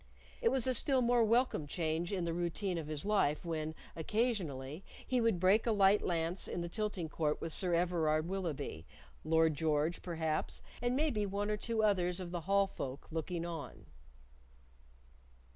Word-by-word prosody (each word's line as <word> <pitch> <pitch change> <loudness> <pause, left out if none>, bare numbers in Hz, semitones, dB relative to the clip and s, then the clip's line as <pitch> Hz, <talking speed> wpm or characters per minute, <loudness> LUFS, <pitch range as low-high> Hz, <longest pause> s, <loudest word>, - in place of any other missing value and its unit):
It 465 - +4
was 265 -3 +1
a 260 - +2
still 260 +1 +3
more 240 0 +4
welcome 230 - +2
change 165 +2 -1
in 190 -3 -1
the 170 -1 -1
routine 175 +1 -1
of 155 - -6
his 155 +1 -4
life 190 -8 +1
when, 160 -1 -3 0.2
occasionally, 165 - -2 0.2
he 255 -1 +1
would 225 -6 +2
break 195 +6 +4
a - - +3
light 200 -1 +5
lance 170 +1 -1
in 175 - -3
the 170 - -3
tilting 205 -4 -2
court 150 -1 -1
with 165 - -1
Sir 180 -2 +4
Everard 165 -2 +1
Willoughby; 155 - -4 0.4
Lord 160 0 +3
George, 155 +2 0
perhaps, 160 -3 -2 0.2
and 245 +1 +1
maybe 265 -8 +1
one 205 +2 -2
or 210 - 0
two 225 0 -1
others 180 -3 +2
of 180 -2 -6
the 175 -1 -3
Hall 200 0 +5
folk, 140 -7 -7
looking 165 +1 -3
on. 165 -3 -7
175 Hz, 170 wpm, -34 LUFS, 160-210 Hz, 0.4 s, light